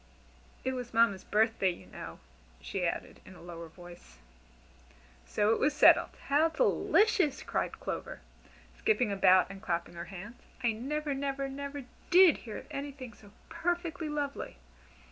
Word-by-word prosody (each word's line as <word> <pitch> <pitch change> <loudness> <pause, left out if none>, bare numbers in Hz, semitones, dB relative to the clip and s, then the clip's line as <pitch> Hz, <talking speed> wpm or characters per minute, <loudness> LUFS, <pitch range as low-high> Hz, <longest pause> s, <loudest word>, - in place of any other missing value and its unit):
It 260 - -1
was 245 -2 -6
Mamma's 225 -5 +3
birthday, 220 -2 +2
you 175 - -7
know," - - -9 0.4
she 180 - -2
added - - -4
in 185 - -13
a - - -14
lower 170 -1 -8
voice. 175 - -14 1.1
So 210 - +2
it - - -1
was 300 - +2
settled. - - +6 0.2
"How 295 +4 +3
delicious!" 405 - +2
cried - - -2
Clover, - - -5 0.5
skipping 250 - +1
about 185 -1 +5
and 195 0 -10
clapping 170 -1 -2
her 170 0 -6
hands: 205 +6 -10 0.2
"I 235 - +3
never, 285 +6 -3
never, 275 0 -2
never 280 +1 -6 0.3
did 360 -2 +7
hear 220 -3 -8
of - - -10
anything 275 -4 -6
so 205 0 -17 0.2
perfectly 335 -1 -2
lovely. 290 -1 -4
250 Hz, 145 wpm, -31 LUFS, 195-290 Hz, 1.1 s, did